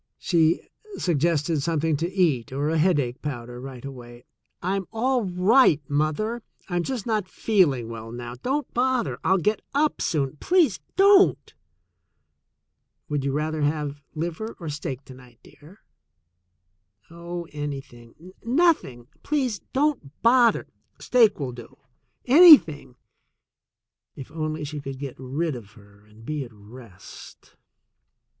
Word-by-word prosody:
She 165 -2 +2 0.3
suggested 165 -2 0
something 160 0 0
to 170 +4 -3
eat 155 - +1
or 140 +3 -1
a 165 - +1
headache 145 -7 +1
powder 120 -4 -6
right 130 -1 -9
away. 120 -2 -10 0.3
"I'm 190 +1 -2
all 245 +1 0
right, 185 - +4
mother. 155 +11 -1 0.3
I'm 175 -3 -1
just 245 +2 -4
not 215 -5 -1
feeling 170 - +1
well 115 0 -8
now. 120 0 -7
Don't 265 - -3
bother. 255 -1 0
I'll 190 - +3
get 210 +4 0
up 300 +1 +1
soon. 145 -2 -1
Please 350 - +2 0.2
don't." 395 0 +4 1.6
"Would 145 -2 -1
you 140 - -1
rather 155 +2 -2
have 145 -1 -2
liver 175 +8 -4
or 165 -3 -6
steak 145 -2 -5
to 130 - -12
night, 125 -2 -17
dear?" 175 +9 -18 1.3
"Oh, 170 +1 -7
anything 145 +2 -8
— - - -34
nothing 240 - +1
— - - -35
please 260 -8 -1
don't 265 - -1
bother 235 0 +4 0.2
— - - -43
steak 230 -7 +4
will 135 -3 -3
do 120 +2 -12 0.3
— 120 - -48
anything" 260 - +7 0.6
— - - -66
if 135 +2 -10
only 155 -1 -4
she 150 +1 -5
could 135 -1 -7
get 135 -2 -6
rid 140 +4 -2
of 105 -3 -11
her 100 -2 -20
and 110 +2 -17
be 150 0 -3
at 120 - -12
rest! 105 -2 -14
155 Hz, 140 wpm, -24 LUFS, 130-205 Hz, 1.6 s, anything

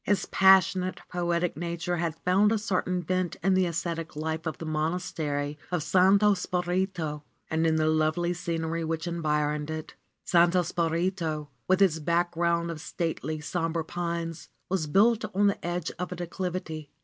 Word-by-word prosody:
His 205 - +1
passionate, 190 -1 +4
poetic 175 -1 0
nature 170 +1 -2
had 165 -2 -1
found 195 +4 +4
a 225 - +3
certain 185 -3 -1
vent 185 0 -1
in 195 +1 +3
the 185 -1 +3
ascetic 165 -1 -3
life 160 +2 -3
of 160 - -3
the 165 - -7
Monastery 155 -2 -2
of 175 -4 0
Santo 195 +4 +5
Spirito 180 -4 -2 0.3
and 160 +1 +2
in 160 - +2
the 155 0 +2
lovely 155 +3 +1
scenery 165 -1 -2
which 160 0 -2
environed 150 -3 -1
it. 155 0 -5 0.3
Santo 175 +1 +4
Spirito, 165 -2 -1 0.2
with 185 +1 +4
its 160 -5 +2
background 170 +1 +1
of 155 -2 -7
stately, 160 -3 -3
somber 165 +1 -1
pines, 170 -1 -4 0.2
was 180 -5 0
built 215 +8 +4
on 205 +1 +3
the 200 - +1
edge 175 -1 -2
of 180 0 -3
a - - -3
declivity. 175 -3 -4
170 Hz, 155 wpm, -28 LUFS, 160-180 Hz, 0.3 s, Santo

